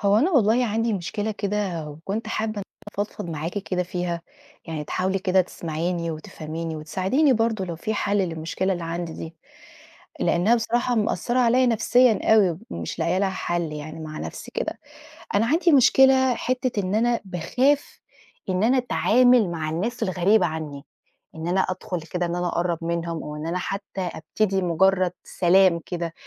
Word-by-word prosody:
هو 200 0 +3
أنا 315 +11 +2
والله 245 - +3
عندي 225 +1 0
مشكلة 205 +3 -2
كده، 200 -6 -2
وكنت 195 +9 -5
حابة 220 0 -1
إن 215 - -8
أنا 200 - -4 0.4
أفضفض 180 -4 -8
معاكِ 165 +5 -3
كده 185 -2 -2
فيها، 175 -1 -3 0.4
يعني 160 -3 -5
تحاولي 190 +4 -1
كده 190 -1 +3
تسمَعيني 170 0 -3
وتفهَميني 160 +1 -6
وتساعديني 190 - +1
برضه 225 -4 0
لو 170 -2 -5
في 215 +6 -3
حَلّ 205 0 0
للمشكلة 175 +1 -1
اللي 175 -2 -4
عندي 165 0 -4
دي، 160 +1 -8 0.9
لإنها 185 +7 +3
بصراحة 240 +2 0
مأثرة 235 +2 0
عليّا 250 +1 +4
نفسيًا 240 -1 +4
أوي، 185 -7 +3
ومش 85 -1 -5
لاقية 180 +2 +1
لها 195 0 +1
حَل 175 -3 -2
يعني 155 +2 -7
مع 155 -1 -7
نَفْسي - - -7
كده، - - -3 0.6
أنا 210 - +3
عندي 335 +6 +3
مشكلة 265 -1 +5
حتّة 255 -4 -1
إن 185 +1 -2
أنا 235 +1 +2
باخاف 250 - 0 0.5
إن 185 +1 +1
أنا 250 +4 +4
أتعامل 245 -4 +4
مع 160 -2 -3
الناس 210 +10 -2
الغريبة 185 +2 +3
عني، 155 -3 -5 0.5
إن 160 +1 -5
أنا 185 +2 +2
أدخُل 185 -2 -3
كده 175 +2 -3
إن 170 0 -2
أنا 175 0 -1
أقرّب 170 -1 -1
منهم 170 -1 -2
أو 150 - -6
إن 150 +1 -5
أنا 170 +2 -1
حتى 195 +1 -4
أبتدي 190 +3 -1
مجرد 185 +1 +2
سلام 180 -1 +3
كده، 170 -2 -4
185 Hz, 165 wpm, -24 LUFS, 170-220 Hz, 0.9 s, مشكلة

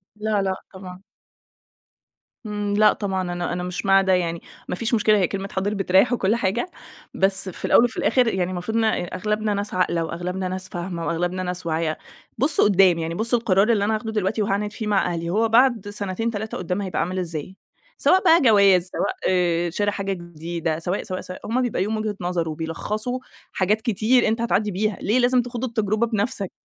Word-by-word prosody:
لا 210 -1 0
لأ 190 -1 -1 0.2
طبعًا. 185 -1 -10 1.4
امم 205 -1 -3
لأ 210 0 +6
طبعًا، 190 -2 -2
أنا 175 -1 -3
أنا 180 0 -3
مش 180 +2 -4
مع 195 0 +5
ده 190 -1 +2
يعني، 170 -2 0 0.3
ما - - -2
فيش 230 +6 -3
مشكلة 215 -1 +4
هي 185 -3 +2
كلمة 195 0 -5
حاضر 195 +2 -1
بتريح 195 +4 +3
وكل 215 -2 +1
حاجة، 235 - -1 0.4
بس 195 0 +1
في - - -7
الأول - - +5
وفي 240 - -1
الآخر 250 -2 +2
يعني 185 -4 0
المفروض 185 +5 -3
إن 225 - +2
أ 220 -4 +1
أغلبنا 210 +2 -1
ناس 205 0 -2
عاقلة 170 -2 +1
وأغلبنا 180 +3 -4
ناس 185 0 -4
فاهمة 175 -1 -5
وأغلبنا 175 +2 -1
ناس 180 0 -3
واعية، 160 -1 -1 0.4
بصوا 290 +3 +5
قدام، 190 -4 +5
يعني 165 0 -3
بصوا 230 +4 +2
القرار 200 -1 +2
اللي 205 -3 +2
أنا 220 - +1
هاخده 220 +1 -4
دلوقتي 215 0 -1
وهاعند 205 +1 -1
فيه 215 0 -5
مع 205 -2 +2
أهلي، 170 0 -3
هو 220 +5 +1
بعد 235 -3 +3
سنتين 205 +2 -2
3 220 0 -5
قدام 180 +2 -3
هيبقى 190 -2 -3
عامل 185 +2 -1
إزاي؟ 170 0 -5 0.4
سواء 375 +1 +3
بقى 335 -1 +6
جواز، 200 -7 +5
سواء - - -2
آآ 175 -2 +1
شرا 205 +4 0
حاجة 195 -1 -3
جديدة، 170 -2 -4
سواء، 180 +4 -2
سواء، 185 -1 -5 0.2
هُم 245 +4 0
بيبقى 245 -6 -1
ليهم 215 +3 -1
وجهة 215 -1 -2
نظر 175 -2 -1
وبيلخصوا 210 +10 -3 0.3
حاجات 205 +3 +1
كتير 235 +2 +2
أنت 225 +1 0
هتعدي 215 -3 +1
بيها، 205 +2 -1
ليه 220 +6 +2
لازم 250 0 +3
تخوض 245 0 -6
التجربة 220 -2 0
بنفْسَك؟ 215 -2 -2
195 Hz, 195 wpm, -23 LUFS, 180-220 Hz, 1.4 s, لأ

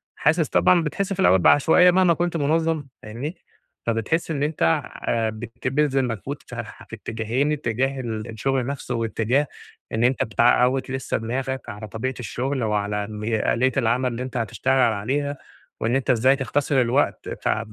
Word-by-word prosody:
حاسس 155 +2 +2
طبعًا 175 -2 +4
بتحس 195 +6 -2
في 195 - -8
الأوّل 95 - +5
بعشوائية 160 - +6
مهما 180 -1 +4
كنت 175 0 -1
منظم 160 +1 +1 0.2
فاهمني؟ 120 - -5 0.5
فبتحس 115 +9 0
إن 145 -2 -1
أنت 150 +1 -3 0.4
آآ 115 -1 +1
بتبذل 130 +5 -1
مجهود 115 -6 -4
ف - - -8
في - - -8
اتجاهين، 115 +6 -1
اتجاه 135 -1 -1
ال 110 -3 -4
الشغل 130 +3 -1
نفسه، 135 -3 -4
واتجاه 115 +5 0 0.4
إن 110 +1 0
أنت 125 +2 +2
بتعوّد 125 +3 +2
لسّه 130 -1 -2
دماغك 130 +3 -3
على 105 +1 -7
طبيعة 115 +5 -3
الشغل 130 +2 -2
وعلى 105 -1 -1
مي 110 +1 -1
آلية 130 +2 +2
العمل 125 +1 +1
اللي 120 +2 -4
أنت 125 -1 -5
هتشتغل 115 +3 -1 0.2
عليها، 140 +7 -2 0.4
وإن 115 +4 0
أنت 135 0 -1
إزاي 130 +2 +4
تختصر 140 0 +1
الوقت 125 +4 0
بتاع 110 - -1
130 Hz, 155 wpm, -23 LUFS, 115-145 Hz, 0.5 s, بعشوائية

